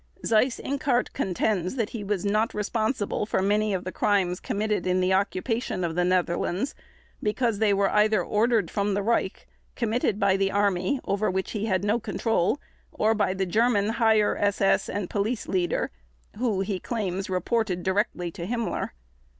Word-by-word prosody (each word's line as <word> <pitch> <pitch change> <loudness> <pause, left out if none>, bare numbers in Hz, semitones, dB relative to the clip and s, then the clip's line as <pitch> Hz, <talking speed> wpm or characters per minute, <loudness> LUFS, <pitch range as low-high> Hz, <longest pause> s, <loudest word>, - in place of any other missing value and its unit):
Seyss 230 +3 +2
Inquart 270 -3 0
contends 185 +1 -1
that 225 -5 -1
he 225 -3 -5
was 200 -1 -2
not 215 +3 +1
responsible 215 0 -1
for - - 0
many 210 +2 +2
of 185 -2 -1
the 185 - -4
crimes 185 -4 +1
committed 210 -2 -1
in 180 0 +2
the 185 +1 +2
occupation 200 +1 -1
of 165 -1 -1
the 180 +2 +1
Netherlands 180 +5 0 0.5
because 215 0 0
they 215 -2 +3
were 195 0 +2
either 210 -3 +3
ordered 220 -4 +1
from 200 -1 0
the 200 - 0
Reich, 220 -3 -1 0.3
committed 225 -3 0
by 200 -2 +3
the 195 0 +1
Army, 200 +4 +1
over 200 +2 0
which 190 +1 -2
he 215 0 -2
had 190 -2 +1
no 210 +3 +2
control, 225 +1 0 0.3
or 220 +1 +2
by 205 -3 0
the 190 0 0
German 215 +2 +2
Higher 220 -2 +3
SS 200 -1 +2
and 200 -2 -2
Police 210 +5 -2
Leader, 180 -2 0 0.5
who, 220 -5 0
he 195 -1 -2
claims, 195 -4 -3
reported 185 0 0
directly 190 -3 0
to 170 +1 -6
Himmler. 235 0 -2
205 Hz, 165 wpm, -26 LUFS, 190-220 Hz, 0.5 s, they